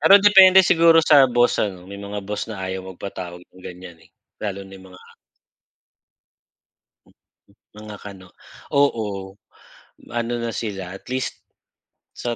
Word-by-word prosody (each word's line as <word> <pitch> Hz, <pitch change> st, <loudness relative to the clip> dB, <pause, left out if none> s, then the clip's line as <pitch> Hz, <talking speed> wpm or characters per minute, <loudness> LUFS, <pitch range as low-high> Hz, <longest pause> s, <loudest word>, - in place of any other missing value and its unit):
Pero 195 Hz, -, +6 dB
depende 190 Hz, -2 st, +7 dB
siguro 165 Hz, -1 st, +5 dB
sa 140 Hz, -5 st, +6 dB
boss 120 Hz, 0 st, +2 dB
ano. 95 Hz, -4 st, -3 dB
May 100 Hz, +1 st, -10 dB
mga 100 Hz, 0 st, -7 dB
boss 105 Hz, +2 st, -5 dB
na 100 Hz, -4 st, -6 dB
ayaw 95 Hz, 0 st, -4 dB
magpatawag 90 Hz, -2 st, -8 dB
ng 95 Hz, -, -20 dB
ganyan 90 Hz, -1 st, -11 dB
eh, -, -, -22 dB, 0.3 s
lalo 100 Hz, -2 st, -5 dB
na 95 Hz, 0 st, -13 dB
mga 95 Hz, -1 st, -15 dB, 2.8 s
mga 105 Hz, 0 st, -10 dB
Kano. 95 Hz, -3 st, -11 dB, 0.5 s
Oo. 105 Hz, -8 st, -1 dB, 0.7 s
ano 120 Hz, 0 st, -3 dB
na 115 Hz, 0 st, -3 dB
sila 95 Hz, -4 st, -6 dB
at -, -, -18 dB
least 130 Hz, -1 st, -4 dB, 0.7 s
sa 120 Hz, -1 st, -4 dB
100 Hz, 130 wpm, -21 LUFS, 95-120 Hz, 2.8 s, depende